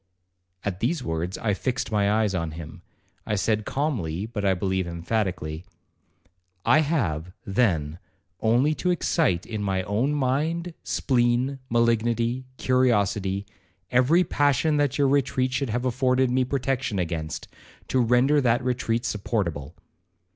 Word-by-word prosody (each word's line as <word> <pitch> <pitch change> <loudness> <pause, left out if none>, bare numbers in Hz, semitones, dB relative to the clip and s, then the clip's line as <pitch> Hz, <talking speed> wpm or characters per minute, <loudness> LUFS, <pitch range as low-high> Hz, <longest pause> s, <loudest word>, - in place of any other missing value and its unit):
At 95 -3 -3
these 130 +5 0
words 85 0 -3
I 105 -2 0
fixed 125 +4 -2
my 100 -1 +2
eyes 105 -2 +2
on 85 -3 -2
him. 80 -1 -9 0.4
I 105 - -1
said 105 +1 0
calmly, 105 - -1
but 110 -2 -5
I 95 -1 +3
believe 95 0 -1
emphatically, 85 -2 -2 1.0
'I 155 - +5
have, 95 - -1
then, 90 -7 0 0.4
only 120 +7 +3
to 180 - -2
excite 160 - +1
in 110 -2 -4
my 95 -2 0
own 115 +10 0
mind, 155 +6 0
spleen, 125 +1 +1
malignity, 115 +1 +1
curiosity, 105 -6 +1 0.5
every 130 +9 +4
passion 145 0 +2
that 145 -2 +1
your 140 -1 +3
retreat 130 -2 +1
should 125 0 -1
have 120 +3 -1
afforded 130 0 +2
me 130 0 +2
protection 130 -4 -1
against, 80 -3 -3 0.4
to 130 - +2
render 125 +5 +4
that 120 0 +2
retreat 120 -2 -1
supportable. 95 - -2
115 Hz, 135 wpm, -25 LUFS, 95-130 Hz, 1.0 s, I